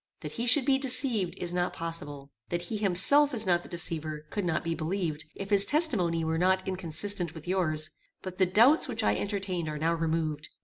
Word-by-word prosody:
That - - -6
he 235 +1 -4
should 250 +2 +6
be 270 -1 +2
deceived, 250 -8 +2
is 175 -1 -2
not 180 0 -2
possible. 145 -4 -7 0.2
That 175 0 -3
he 215 +5 -5
himself 215 +9 +4
is 220 -1 +4
not 175 -1 +1
the - - -14
deceiver, 155 -3 -3
could 205 -3 -3
not 165 -2 -1
be 165 -1 -2
believed, 165 -2 -4
if 195 +1 -8
his 200 -1 +6
testimony 200 - +1
were 160 0 -2
not 185 +1 +1
inconsistent 180 -1 0
with 160 +1 -11
yours; 155 -4 0 0.3
but 185 0 -8
the 185 - +3
doubts 235 - +4
which - - -1
I 105 0 +1
entertained 190 - -4
are 150 - -5
now 165 +2 0
removed. 160 -2 -3
175 Hz, 205 wpm, -28 LUFS, 160-205 Hz, 0.3 s, should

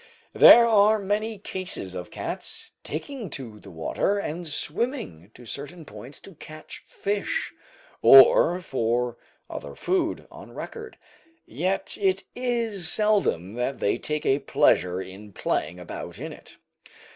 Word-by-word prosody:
There 235 0 +9
are 215 -1 +5
many 210 +2 -2
cases 185 - -4
of 90 -1 -7
cats - - -6
taking 220 - -6
to 115 -6 -10
the 100 - -13
water 90 - -1
and 175 -3 -4
swimming 150 - -3
to 120 - -14
certain 150 +7 -7
points 120 +4 -11
to 195 - -13
catch 155 0 -11
fish, 200 0 -2 0.5
or 135 +6 +7
for 120 -4 -1 0.3
other - - -8
food, 355 -3 -1
on - - -12
record; 445 -1 -8 0.5
yet 185 +5 -2
it 190 -1 +1
is 230 -8 0
seldom 205 - +1
that 125 +3 -2
they 100 - 0
take 150 0 -3
a 135 +1 +3
pleasure 90 -8 +2
in 100 +2 -9
playing 90 - -2
about 90 - -8
in - - -6
it. - - -14
160 Hz, 135 wpm, -25 LUFS, -, 0.5 s, There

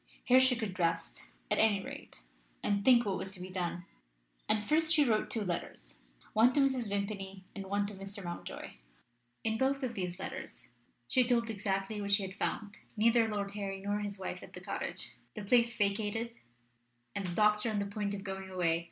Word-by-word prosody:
Here 255 +1 +7
she 260 -1 +5
could 205 -5 -4
rest, 165 -1 0 0.3
at - - +3
any 215 -2 +5
rate, - - -9 0.4
and 200 0 +1
think 240 0 +6
what 195 -2 0
was 190 - -1
to 190 - -9
be 185 +1 -7
done. 175 -1 -2 0.6
And 215 -1 +2
first 315 +5 +3
she 305 -3 +5
wrote 220 -4 +2
two 225 - -1
letters 175 -3 -4 0.3
one 230 +4 +6
to 290 - +3
Mrs. 265 -5 +2
Vimpany 195 -1 -3
and 195 -1 -5
one 200 +1 +1
to 205 - -5
Mr. 195 +1 -5
Mountjoy. 175 -1 -6 0.7
In 220 0 0
both 270 +1 +2
of 245 -2 -1
these 180 -4 -3
letters 125 -9 -7 0.4
she 255 - +4
told 235 -2 +2
exactly 200 0 -2
what 200 0 -2
she 200 0 +5
had 190 0 -5
found: 205 0 -3 0.2
neither 230 +1 +5
Lord 205 -2 -2
Harry 200 -1 -4
nor 205 +1 -1
his 205 -1 -4
wife 190 - -5
at - - -12
the - - -7
cottage, - - -4 0.3
the 210 - -5
place 235 +3 +3
vacated, 210 +2 0 0.8
and 195 - -2
the 175 - -4
doctor 210 +2 +4
on 215 - -1
the 200 - 0
point 205 0 -2
of 195 - -6
going 190 -1 -5
away. 170 -3 +2
205 Hz, 195 wpm, -33 LUFS, 195-225 Hz, 0.8 s, Here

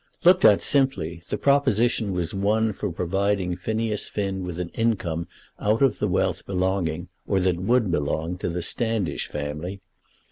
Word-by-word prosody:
Looked 180 +1 +6
at 105 -2 +6
simply, 95 - +1
the - - -1
proposition 120 -6 +2
was 90 -2 -2
one 105 +3 +1
for 100 -1 -3
providing 95 +1 0
Phineas 110 +3 -2
Finn 95 -2 -2
with 90 -1 -5
an 90 -2 -3
income 90 -8 -1 0.3
out 110 +5 +2
of 130 -8 +2
the - - +1
wealth - - 0
belonging, 90 -3 -1 0.2
or 95 - +2
that 90 -1 +1
would 110 +2 +2
belong, 80 +3 -1
to - - -2
the 85 0 -2
Standish 110 - 0
family. 75 +6 -5
95 Hz, 155 wpm, -24 LUFS, 85-110 Hz, 0.3 s, Looked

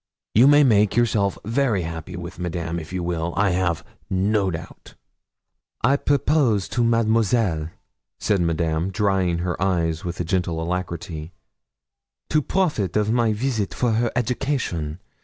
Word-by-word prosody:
You 120 +5 +6
may 145 +1 +7
make 105 -6 +3
yourself 110 -4 +2
very 115 -4 +1
happy 80 +2 -6
with 85 0 -7
Madame 85 -1 -3
if 80 +1 -9
you 90 -1 -3
will, 85 -1 -2
I 100 -1 +3
have 90 -3 0 0.3
no 95 +1 +1
doubt.' 80 -2 -8 0.9
'I 135 +4 +4
propose 140 -8 +2
to 120 - 0
Mademoiselle,' 110 -7 +2 0.5
said 100 -4 +1
Madame, 85 +1 0
drying 95 -3 +1
her 85 -1 -3
eyes 85 -4 0
with 90 0 -5
a - - 0
gentle 85 -1 -1
alacrity, 85 -1 -4 1.0
'to 155 - +3
profit 145 - 0
of 105 0 +1
my 115 -1 +2
visit 110 -2 -1
for 120 -2 +1
her 115 +1 +1
education. 120 - -2
95 Hz, 140 wpm, -23 LUFS, 85-115 Hz, 1.0 s, may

